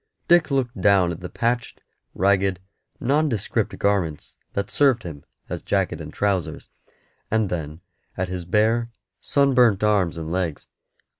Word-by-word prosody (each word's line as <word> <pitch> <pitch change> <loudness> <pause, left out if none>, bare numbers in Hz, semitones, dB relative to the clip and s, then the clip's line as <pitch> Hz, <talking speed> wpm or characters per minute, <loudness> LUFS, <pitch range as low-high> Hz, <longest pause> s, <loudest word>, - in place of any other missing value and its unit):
Dick 175 -2 +5
looked 125 -7 -1
down 95 -3 +4
at 85 - -6
the 90 - -7
patched, 120 0 -2 0.4
ragged, 95 -1 +2 0.4
nondescript 135 -4 0
garments 95 -7 -1 0.2
that 100 0 -3
served 135 -6 +3
him 75 -5 -8 0.2
as - - -5
jacket - - -1
and - - -8
trousers, 95 -6 -2 0.6
and 110 -2 +1
then 80 -1 -4 0.4
at 90 - -1
his 90 -1 -5
bare, 110 +6 +1 0.3
sunburnt 125 -8 +3
arms 100 -6 +2
and 80 0 -5
legs. 85 -4 -2
100 Hz, 135 wpm, -23 LUFS, 90-120 Hz, 0.6 s, Dick